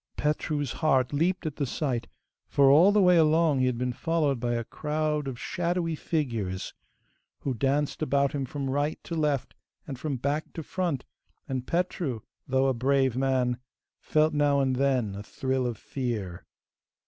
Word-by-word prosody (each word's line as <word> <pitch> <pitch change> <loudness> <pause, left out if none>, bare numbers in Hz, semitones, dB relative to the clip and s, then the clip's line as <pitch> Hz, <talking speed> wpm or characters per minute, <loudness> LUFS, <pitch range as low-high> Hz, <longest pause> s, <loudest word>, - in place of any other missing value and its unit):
Petru's 150 -2 -1
heart 135 -4 +1
leaped 175 +5 +1
at 155 -2 -3
the 140 - 0
sight, 120 -3 -2 0.4
for 140 -1 +5
all 170 +8 +7
the 205 -1 +4
way 180 -1 +6
along 160 -2 +4
he 130 - +3
had 125 -2 0
been 125 0 -1
followed 150 -2 0
by 120 0 -1
a 115 - -1
crowd 150 +2 -2
of 125 -3 -5
shadowy 175 +1 -1
figures 115 - -2 0.7
who 135 - -1
danced 140 +5 0
about 140 -2 +2
him 140 -2 -2
from 135 +1 -4
right 145 +3 0
to - - -7
left, 150 -5 0 0.3
and 135 -4 -7
from 145 -4 -2
back 140 +5 -2
to 160 - -5
front, 170 -6 -2 0.4
and 130 -2 -3
Petru, 170 - -1 0.3
though 130 0 +2
a 135 - +3
brave 130 0 +2
man, 130 -2 +1 0.4
felt 155 0 +2
now 145 -1 +3
and 130 -2 +1
then 130 -6 +1
a 100 - -6
thrill 130 +4 -1
of 120 -3 -4
fear. 110 -9 -4
140 Hz, 170 wpm, -27 LUFS, 125-155 Hz, 0.7 s, all